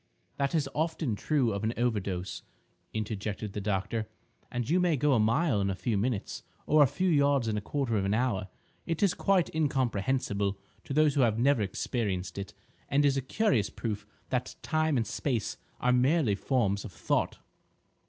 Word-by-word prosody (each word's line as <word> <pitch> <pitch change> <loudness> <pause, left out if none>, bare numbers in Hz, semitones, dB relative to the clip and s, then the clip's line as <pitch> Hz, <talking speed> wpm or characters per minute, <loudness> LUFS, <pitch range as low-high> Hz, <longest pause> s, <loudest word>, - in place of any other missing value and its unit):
"That 140 +3 0
is 150 -4 +1
often 155 -6 -1
true 130 -1 +1
of 100 +1 -3
an 110 +2 0
overdose," 100 -6 -1 0.5
interjected 105 -1 -4
the 105 - -3
doctor, 105 +2 -1 0.4
"and 120 -1 -2
you 170 +6 +3
may 175 -4 +2
go 145 +2 +3
a 120 - +4
mile 115 +2 +2
in 100 - +1
a 95 - -1
few 115 +3 -1
minutes, 105 0 -1 0.2
or 155 0 +5
a 145 - +7
few 180 +8 -1
yards 140 -6 +3
in 110 - 0
a 105 - -1
quarter 130 0 -1
of 95 - -1
an 100 +2 +1
hour. 110 -6 0 0.4
It 165 +3 -1
is 195 - +4
quite 195 -4 +2
incomprehensible 125 -8 0 0.3
to - - -4
those 155 -1 +4
who 140 - +2
have 115 -3 +3
never 125 0 +3
experienced 95 -3 -2
it, 100 0 -7 0.3
and 145 +1 +3
is 140 -1 +3
a 135 - 0
curious 130 - +1
proof 105 -3 -4 0.2
that 125 -1 -2
time 155 -2 +1
and 115 - +1
space 115 +1 -2 0.2
are 125 0 +3
merely 130 -1 +3
forms 100 -2 0
of 105 - -8
thought." - - -1
120 Hz, 185 wpm, -29 LUFS, 105-145 Hz, 0.5 s, a